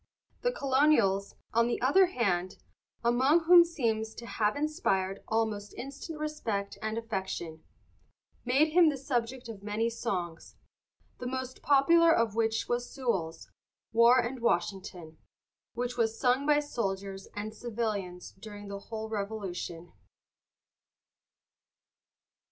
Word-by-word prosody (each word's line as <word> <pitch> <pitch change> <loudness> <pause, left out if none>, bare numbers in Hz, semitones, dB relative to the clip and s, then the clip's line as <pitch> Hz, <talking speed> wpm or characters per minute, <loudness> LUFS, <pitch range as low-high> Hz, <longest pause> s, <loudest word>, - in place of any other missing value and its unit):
The - - +1
Colonials, 260 - +2 0.2
on 230 +1 +3
the 240 - -1
other 325 +10 +5
hand, 185 - -1 0.5
among 260 +8 +4
whom 350 +2 +8
he 340 - +7
seems 225 -9 -2
to 235 - -9
have 215 -1 0
inspired 285 - -1
almost 220 -2 -1
instant 280 +4 -7
respect 230 -10 -3
and 220 +1 -2
affection, 190 -7 -4 0.8
made 270 +5 +3
him 335 0 +6
the 290 - -2
subject 250 -2 -2
of 220 -4 -8
many 215 +3 -1
songs, 180 -8 -4 0.6
the 250 - -4
most 260 0 -5
popular 330 +4 +5
of 230 -8 +2
which 225 0 0
was 245 0 -2
Sewall's 190 -11 -3 0.4
"War 235 +2 +6
and 250 +1 -1
Washington," 180 -5 -2 0.6
which 245 +1 -3
was 225 -1 0
sung 255 +3 +2
by 295 0 +4
soldiers 195 -8 -4
and 210 +1 -5
civilians 210 -6 -4
during 205 -1 -9
the 200 0 -5
whole 220 +1 -6
Revolution. 200 -5 -5
230 Hz, 125 wpm, -30 LUFS, 200-265 Hz, 0.8 s, whom